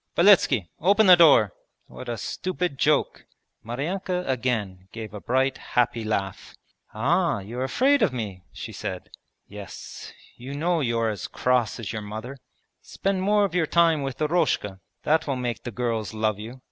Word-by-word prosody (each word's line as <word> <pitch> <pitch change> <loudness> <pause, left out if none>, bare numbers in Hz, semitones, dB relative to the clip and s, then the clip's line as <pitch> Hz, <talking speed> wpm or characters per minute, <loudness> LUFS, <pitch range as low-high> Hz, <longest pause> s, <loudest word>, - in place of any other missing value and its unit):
'Beletski! 170 - +5
Open 205 +6 +4
the 185 -2 +9
door! 145 - +6 0.3
What - - -10
a 120 - -3
stupid 180 - -3
joke!' 150 -1 +1 0.4
Maryanka 180 - -3
again 110 -8 -2
gave 110 -3 -8
a 105 - -7
bright 130 +2 0 0.2
happy 120 -2 +2
laugh. 100 -3 -3 0.4
'Ah, 155 - +1
you're 115 +6 -5
afraid 270 - +2
of - - +3
me?' 105 -7 -5
she - - -8
said. - - -6 0.3
'Yes, - - -10 0.3
you 130 +3 -7
know 170 +3 +1
you're 115 -3 0
as 105 -4 -4
cross 125 -3 0
as 110 -3 -5
your 110 - -4
mother.' 110 +6 -7 0.5
'Spend 195 -1 -2
more 205 +1 +3
of 190 - -4
your 175 -3 +1
time 165 -2 +3
with 135 -2 -4
Eroshka; 150 - 0 0.2
that 155 +1 +2
will 135 - 0
make 125 -2 -3
the - - -6
girls 115 -2 -3
love 110 -1 0
you!' 115 +5 -8
125 Hz, 160 wpm, -25 LUFS, 110-170 Hz, 0.5 s, the